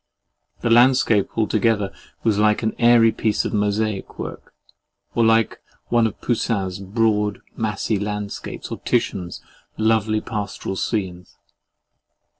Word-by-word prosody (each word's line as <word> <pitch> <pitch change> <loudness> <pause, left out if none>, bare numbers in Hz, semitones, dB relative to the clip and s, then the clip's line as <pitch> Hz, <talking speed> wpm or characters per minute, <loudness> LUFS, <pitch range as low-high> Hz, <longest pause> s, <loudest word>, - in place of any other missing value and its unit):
The 120 - 0
landscape 120 -4 +4
altogether 110 -2 +1 0.3
was 105 -3 +2
like 105 +1 +3
an 110 - 0
airy 120 -1 +6
piece 110 -1 0
of - - -3
mosaic 105 0 -1
work, - - -8 0.6
or 115 - +2
like 115 0 +2 0.3
one 120 -1 +3
of 105 - -8
Poussin's 100 -6 -1
broad 105 +1 0 0.2
massy 105 -1 -1
landscapes 105 0 -5
or - - -4
Titian's 90 -2 -2 0.4
lovely 110 -1 +2
pastoral 105 -3 -4
scenes. 95 -4 -3
110 Hz, 115 wpm, -22 LUFS, 100-115 Hz, 0.6 s, airy